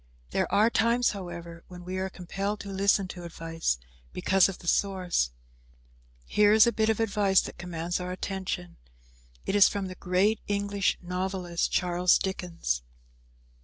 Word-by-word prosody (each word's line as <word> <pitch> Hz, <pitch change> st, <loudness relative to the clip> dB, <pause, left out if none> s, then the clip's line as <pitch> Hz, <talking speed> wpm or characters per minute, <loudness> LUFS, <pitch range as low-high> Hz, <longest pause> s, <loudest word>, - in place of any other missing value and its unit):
There -, -, 0 dB
are 220 Hz, +3 st, +4 dB
times, 235 Hz, +2 st, +3 dB
however, 170 Hz, -3 st, -8 dB
when 180 Hz, -1 st, -11 dB
we 185 Hz, +1 st, -4 dB
are 190 Hz, 0 st, -2 dB
compelled 195 Hz, +3 st, -4 dB
to 200 Hz, -, -8 dB
listen 195 Hz, 0 st, +2 dB
to 175 Hz, -1 st, -8 dB
advice, 165 Hz, -, -2 dB, 0.4 s
because 195 Hz, 0 st, +3 dB
of 195 Hz, -, -6 dB
the 175 Hz, -, -12 dB
source. 185 Hz, -, +1 dB, 1.0 s
Here 210 Hz, -, +4 dB
is 220 Hz, 0 st, +7 dB
a 235 Hz, -, +3 dB
bit 220 Hz, -1 st, +1 dB
of 220 Hz, -, +1 dB
advice 200 Hz, -3 st, +3 dB
that -, -, -9 dB
commands 175 Hz, 0 st, -3 dB
our 180 Hz, 0 st, -4 dB
attention. 185 Hz, -1 st, -4 dB, 0.7 s
It -, -, -1 dB
is 205 Hz, -, +8 dB
from 200 Hz, -1 st, -3 dB
the 185 Hz, -, -6 dB
great 185 Hz, +4 st, +1 dB
English 200 Hz, -1 st, 0 dB
novelist, 180 Hz, -1 st, -2 dB
Charles 180 Hz, 0 st, +3 dB
Dickens. 170 Hz, -, -2 dB
185 Hz, 155 wpm, -28 LUFS, 175-200 Hz, 1.0 s, is